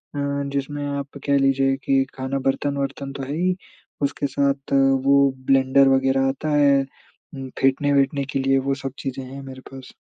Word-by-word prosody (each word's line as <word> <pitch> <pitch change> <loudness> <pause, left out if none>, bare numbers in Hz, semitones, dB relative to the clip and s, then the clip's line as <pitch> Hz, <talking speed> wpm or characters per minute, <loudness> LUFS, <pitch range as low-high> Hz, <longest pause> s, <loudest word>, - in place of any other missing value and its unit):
अ, 140 0 -2
जिसमें 145 +1 -3
आप 140 0 -5
कह 140 -1 +3
लीजिए 135 0 +2
कि 135 -1 +3
खाना, 130 +1 -3
बर्तन-वर्तन 140 0 -2
तो 135 - -6
है 140 +3 -4
ही, 180 +2 +1 0.5
उसके 140 0 -1
साथ 140 0 -1 0.3
वो 140 0 +5 0.3
ब्लेंडर 135 0 +4
वगैरह 135 0 +2
आता 145 +3 -3
है, 140 -1 +4 0.5
उम, 135 -1 -7
फेटने-वेटने 140 +1 +2
के - - 0
लिए, 135 0 +2
वो 135 +1 -1
सब 135 - -2
चीज़ें 135 -1 -5
हैं 135 +2 -9
मेरे 130 -1 -10
पास। 135 -1 -11
135 Hz, 165 wpm, -22 LUFS, 135-140 Hz, 0.5 s, वो